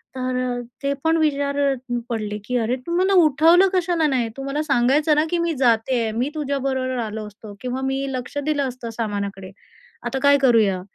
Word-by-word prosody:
तर 255 0 -2
अ, 245 -1 -2 0.2
ते 280 0 +1
पण 325 +1 +3
विचारत 280 -2 +1 0.3
पडले 210 -2 -3
की 250 +1 -1
"अरे! 235 +2 0
तू 340 - -1
मला 380 +2 +2
उठवलं 325 +6 +5
कशाला 345 -3 +1
नाही? 250 -5 0
तू 270 - -5
मला 280 +2 -2
सांगायचं 285 +2 +2
ना, 300 - +2
की 350 - 0
मी 335 -1 0
जाते, 230 -1 +2
मी 245 +6 -1
तुझ्याबरोबर 270 -3 -2
आलो 215 0 -6
असतो 210 0 -12
किंवा 255 +1 -3
मी 270 +1 -1
लक्ष 255 +2 -5
दिलं 300 -2 0
असतं 245 -2 -7
सामानाकडे. 200 -3 -4 0.5
आता 270 - -2
काय 285 0 +6
करूया?" 220 -8 +3
265 Hz, 180 wpm, -22 LUFS, 235-295 Hz, 0.5 s, काय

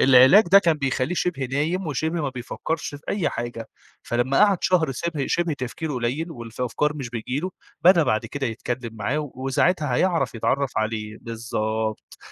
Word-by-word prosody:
العلاج 130 - +7
ده 195 - +9
كان 170 -4 +3
بيخلّيه 135 +3 0
شِبه 165 -7 -1
نايم، 155 +8 -1
وشِبه 160 +3 -1
ما 140 - 0
بيفكرش 135 +5 -4
في 145 - -10
أي 185 -7 +1
حاجة، 120 -1 -5 0.3
فلما 120 +3 0
قعد 200 -3 +2
شهر 165 -7 +2
شِبه 155 0 -2
شِبه 170 -2 0
تفكيره 145 +3 -4
قليل، 130 +8 -2
والفَ 120 -5 -9
الأفكار 150 +4 0
مش 130 -5 -5
بتيجي 125 +4 -3
له، 185 - -3 0.3
بدأ 175 -2 +7
بعد 110 -7 0
كده 140 -1 -3
يتكلم 120 0 -4
معاه 140 +8 -2
وساعتها 135 +3 +1
هيعرف 170 -2 +1
يتعرف 135 +3 0
عليه، 110 -1 -3
بالضبط. 110 -1 -3
135 Hz, 165 wpm, -24 LUFS, 120-160 Hz, 0.3 s, ده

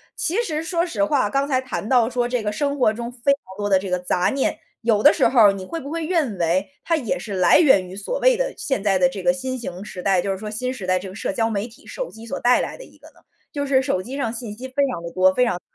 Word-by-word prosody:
其 390 +9 0
实 310 -6 -2
说 335 +1 0
实 310 -3 -1
话， 290 -8 +2
刚 275 +5 0
才 260 -3 +1
谈 260 -4 -5
到 245 -3 +4
说 245 -1 -1
这 245 -3 -2
个 210 - -1
生 280 +6 -1
活 220 -4 +3
中 235 +2 -5
非 250 +3 +1
常 280 - -7 0.2
多 205 0 -2
的 190 -2 +4
这 190 -1 -6
个 180 - +1
杂 180 0 0
念， 275 -1 -1 0.2
有 220 -3 +2
的 - - +8
时 200 - +3
候 230 -5 +6
你 190 -1 -6
会 330 - -5
不 280 0 -8
会 330 0 -3
认 305 - 0
为， 180 +3 0
它 330 - +1
也 270 -3 -1
是 205 - -7
来 185 -1 +5
源 200 - +5
于 185 - -9
所 205 - -4
谓 - - +4
的 - - -1
现 265 -8 -2
在 195 -2 +2
的 180 -1 +4
这 190 0 -7
个 265 - +4
新 260 -1 -4
型 185 -5 -7
时 185 -3 -8
代， 190 -3 +3
就 195 - -2
是 190 - -2
说 215 - -7
新 255 +4 -2
时 205 -8 -7
代 185 0 +2
这 190 0 -8
个 190 - -11
社 195 - -3
交 225 +2 0
媒 210 +1 -2
体、 230 - -18
手 - - -5
机 220 +1 -12
所 275 - -4
带 245 +1 +4
来 - - -5
的 - - -10
一 - - -18
个 - - -15
呢？ - - -21 0.3
就 285 -1 -3
是 265 -1 +3
手 185 -7 -1
机 255 +7 -7
上 235 -6 -1
信 230 -2 -6
息 255 +3 -8
非 260 - -25 0.2
常 170 - -6
地 170 - -6
多、 185 +1 +4
非 250 - +2
常 185 -7 0
杂 - - -15
235 Hz, 330 characters per minute, -22 LUFS, 195-275 Hz, 0.3 s, 的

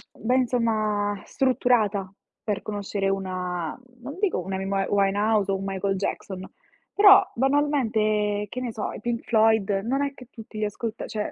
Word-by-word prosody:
ben 250 +4 +1
insomma 215 -4 0
strutturata 220 -7 +1 0.3
per 210 -2 -2
conoscere 200 -1 -2
una 180 -4 -3 0.2
non 280 +6 -8
dico 405 - +1
una 190 +2 -4
Amy 190 - -4
Wi 195 0 0
Winehouse 205 +1 +2
o 195 - +1
un 195 - -6
Michael 195 0 -1
Jackson, 190 -1 -4 0.4
però 395 -1 +8
banalmente, 220 -7 +1
che 250 - -5
ne 245 - -3
so, 215 -2 -4
i - - -8
Pink 235 0 -2
Floyd 220 -2 +3
non 265 +4 0
è 280 -1 -2
che 250 -3 -13
tutti 220 -2 -11
li 215 - 0
ascolta 225 +2 -4
cioè 210 -1 -3
215 Hz, 165 wpm, -25 LUFS, 195-240 Hz, 0.4 s, però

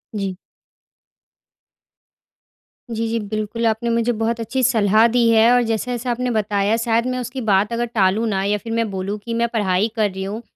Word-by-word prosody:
जी। 195 -3 -3 2.5
जी, 230 0 -2
जी, 230 0 -1
बिल्कुल, 215 +2 -3
आपने 225 +1 0
मुझे 235 +1 +1
बहुत 230 +1 -1
अच्छी 230 +4 -2
सलाह 220 -2 +4
दी 240 -1 +4
है 225 +1 +5
और 245 - +4
जैसा-जैसा 245 +2 -2
आपने 250 +1 -2
बताया 205 -1 +1
शायद 230 +1 +1
मैं 255 - -3
उसकी 250 +2 -5
बात 200 +3 +2
अगर 240 +1 0
टालूँ 215 -1 +1
ना 195 -2 -1
या 205 +1 +1
फिर 225 +2 -6
मैं 230 -1 0
बोलूँ 195 +2 -3
कि 230 - -4
मैं 235 0 +1
पढ़ाई 205 -1 +1
कर 215 -2 +1
रही 190 0 -5
हूँ, 210 +4 -5
225 Hz, 180 wpm, -20 LUFS, 205-235 Hz, 2.5 s, है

